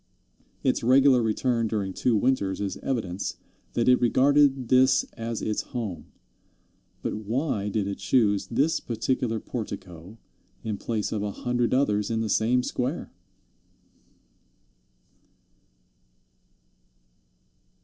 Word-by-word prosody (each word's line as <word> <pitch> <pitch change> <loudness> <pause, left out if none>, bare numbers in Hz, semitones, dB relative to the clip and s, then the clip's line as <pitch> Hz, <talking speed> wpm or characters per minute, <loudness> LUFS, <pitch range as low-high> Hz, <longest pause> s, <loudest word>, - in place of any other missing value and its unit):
Its - - +1
regular 130 +1 +5
return 115 +1 0
during 100 -3 -2
two 120 +3 +1
winters 105 -4 +1
is 100 -2 -2
evidence 100 -8 -3 0.4
that 115 - 0
it 125 0 +5
regarded 135 +1 +3
this 130 +1 +5
as 115 0 -4
its 105 - -1
home; 110 - -6 1.0
but - - -2
why 110 -1 -2
did 105 -1 -1
it 100 - -4
choose 100 -2 +2
this 145 +9 +1
particular 115 0 -1
portico 95 -4 -7 0.5
in 110 -2 -2
place 110 0 -3
of 110 - -2
a 105 - -2
hundred 120 +3 -1
others 105 -6 +1
in 115 -1 -1
the 110 - -2
same 120 +5 +2
square? 130 +6 -3
115 Hz, 110 wpm, -26 LUFS, 105-125 Hz, 1.0 s, regular